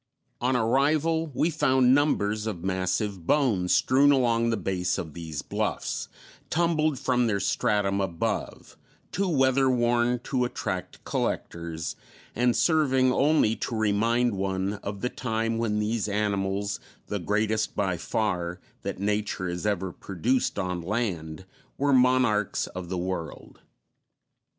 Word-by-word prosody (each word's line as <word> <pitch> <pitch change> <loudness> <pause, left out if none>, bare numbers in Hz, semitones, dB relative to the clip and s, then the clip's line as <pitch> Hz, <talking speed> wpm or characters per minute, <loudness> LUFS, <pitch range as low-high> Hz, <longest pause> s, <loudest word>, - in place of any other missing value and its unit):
On 125 +1 +1
arrival, 150 +7 +2
we 165 - +2
found 130 -5 +3
numbers 110 -7 +1
of 90 -6 -4
massive 95 0 -1
bones 110 -12 +2
strewn 130 +2 +5
along 115 -4 +2
the 115 - 0
base 90 -3 -1
of 80 -3 -5
these 80 -3 -6
bluffs, - - -2 0.4
tumbled 155 -3 +1
from 125 -2 +1
their 100 -3 0
stratum 100 0 +1
above, 85 -4 -3 0.3
too 195 0 0
weather 135 -3 +3
worn 120 0 +2
to 125 -2 0
attract 125 - -4
collectors, 85 -1 -3 0.4
and 120 +1 +2
serving 135 -6 +3
only 140 -6 +3
to 115 - -3
remind 115 +3 +2
one 95 0 -1
of 100 -1 -5
the 125 - 0
time 115 -2 -2
when 110 -2 0
these 105 0 -1
animals 100 -1 -1 0.3
the 105 - -3
greatest, 110 +4 0
by - - 0
far, 90 -4 -2 0.2
that - - -4
nature 105 -2 -1
has 90 +3 -3
ever 95 -3 -1
produced 110 +10 -1
on 90 -1 -2
land 90 -5 -3 0.3
were 140 0 +2
monarchs 125 -5 +3
of 90 -1 -7
the 95 - -2
world. 90 -3 -5
110 Hz, 130 wpm, -27 LUFS, 95-130 Hz, 0.4 s, strewn